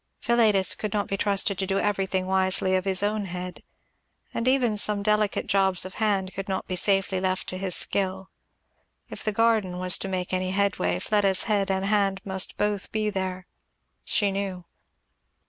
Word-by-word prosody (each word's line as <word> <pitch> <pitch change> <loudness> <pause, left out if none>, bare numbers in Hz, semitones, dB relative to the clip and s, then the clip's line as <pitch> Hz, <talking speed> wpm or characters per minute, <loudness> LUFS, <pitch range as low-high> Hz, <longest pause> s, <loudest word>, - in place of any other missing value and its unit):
Philetus 220 -5 +3
could 210 -2 -5
not 205 -1 -1
be 195 - -2
trusted 200 -1 +1
to 190 - -1
do 195 0 0
everything 195 -2 -1
wisely 190 0 +2
of 185 0 -1
his 190 0 +2
own 210 0 -1
head, 180 0 -7 0.7
and 230 - -2
even 255 -4 +2
some 205 0 +2
delicate 210 -1 +1
jobs 190 -3 +2
of 185 - -8
hand 195 -3 0
could 195 +1 -6
not 190 - -2
be 185 - -3
safely 195 0 +1
left 185 0 -1
to 185 - -3
his 190 -2 +1
skill; 190 -1 -1 0.8
if - - -5
the 215 - 0
garden 215 -4 +1
was 180 0 +2
to - - -4
make 185 -1 -3
any 185 0 -1
headway 200 0 0
Fleda's 200 -3 +2
head 200 -3 0
and 190 0 -1
hand 200 -2 +1
must 190 -1 -1
both 205 -2 -1
be 215 -1 -1
there, 185 -2 -4 0.6
she 205 -2 +1
knew. 195 -2 -4
195 Hz, 180 wpm, -25 LUFS, 185-205 Hz, 0.8 s, Philetus